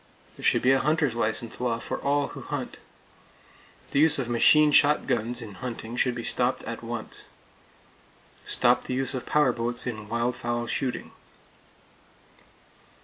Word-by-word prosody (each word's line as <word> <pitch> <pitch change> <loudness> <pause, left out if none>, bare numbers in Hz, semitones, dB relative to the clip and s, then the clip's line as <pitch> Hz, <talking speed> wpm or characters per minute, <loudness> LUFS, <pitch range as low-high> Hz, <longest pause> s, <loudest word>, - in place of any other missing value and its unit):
There - - -13
should - - +3
be 130 - +5
a 135 - +4
hunter's 150 -2 +1
license 115 +1 -1
law 120 -2 0
for - - -5
all 140 0 0
who - - -9
hunt. - - -5 1.1
The 140 - +1
use 160 +1 +6
of 130 -3 -3
machine 150 +6 +5
shotguns 120 -5 +2
in 105 -3 -9
hunting 120 -2 -6
should 125 0 +1
be 120 - -5
stopped, 125 +2 0
at 115 - -6
once. 115 -1 -6 1.2
Stop 125 0 +2
the 125 - -3
use 135 +1 0
of 130 - -5
power 150 -4 +3
boats 120 +1 -2
in 110 -4 -5
wild 120 +2 -1
fowl 120 0 -3
shooting. 125 +1 -3
120 Hz, 150 wpm, -26 LUFS, 115-135 Hz, 1.2 s, use